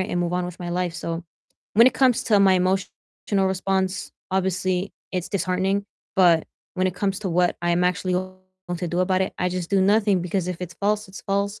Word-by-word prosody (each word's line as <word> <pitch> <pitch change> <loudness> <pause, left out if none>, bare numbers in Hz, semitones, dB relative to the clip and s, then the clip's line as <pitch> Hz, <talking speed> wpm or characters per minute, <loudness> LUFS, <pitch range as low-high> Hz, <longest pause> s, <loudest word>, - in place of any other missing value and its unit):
it 185 +3 -2
and 175 - -1
move 175 0 -1
on 180 0 0
with 180 0 -8
my 175 -1 -5
life, 175 -1 -1
so, 165 +1 -4 0.5
when 230 +4 +7
it 255 - +4
comes 255 -2 +3
to 210 -4 +4
my 195 -1 +6
emotional 190 +1 -1
response, 190 0 -1 0.2
obviously, 185 0 0 0.2
it's 180 -2 -2
disheartening, 190 +1 0 0.3
but 175 -4 +5 0.3
when 185 0 +1
it 180 - -5
comes 195 -1 -1
to 195 - -2
what 175 +1 +2
I'm 175 +1 +2
actually 180 0 0
going 185 0 -6
to 175 - -3
do 175 - -2
about 185 0 +2
it, 190 - -2
I 180 - +1
just 180 -1 -4
do 195 -1 +3
nothing, 200 -1 +3
because 180 0 -1
if 180 - -3
it's 175 -1 -6
false, 205 +3 0
it's 190 - -10
false, 200 +1 -1
185 Hz, 210 wpm, -24 LUFS, 180-195 Hz, 0.5 s, when